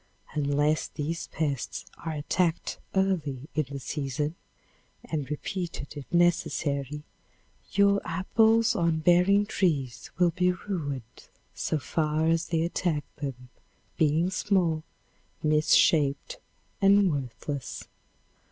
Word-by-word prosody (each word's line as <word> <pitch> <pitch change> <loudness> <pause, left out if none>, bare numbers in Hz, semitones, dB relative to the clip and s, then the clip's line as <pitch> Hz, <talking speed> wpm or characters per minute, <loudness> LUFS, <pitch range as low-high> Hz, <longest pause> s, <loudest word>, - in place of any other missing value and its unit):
Unless 145 +1 +1
these 160 +2 -4
pests 145 -6 -3 0.2
are 160 - -3
attacked 165 +3 -1 0.2
early 180 -9 0
in 155 0 0
the 140 - -5
season 145 +2 -3 0.7
and 150 -4 -3
repeated 165 -1 -4
if 145 -2 -9
necessary, 150 -4 +1 0.7
your 200 0 +4
apples 220 +6 +3
on 165 -2 +1
bearing 180 +5 +4
trees 140 - -1
will 175 -1 +4
be 180 +1 +2
ruined 145 - -6 0.2
so 155 - -1
far 155 +2 0
as 165 0 +2
they 165 -1 +1
attack 170 -3 -1
them, 130 -3 -6 0.5
being 160 +4 +2
small, 180 -5 +1 0.6
misshaped 155 - +3 0.4
and 195 -1 +5
worthless. 135 0 -5
160 Hz, 105 wpm, -28 LUFS, 145-180 Hz, 0.7 s, and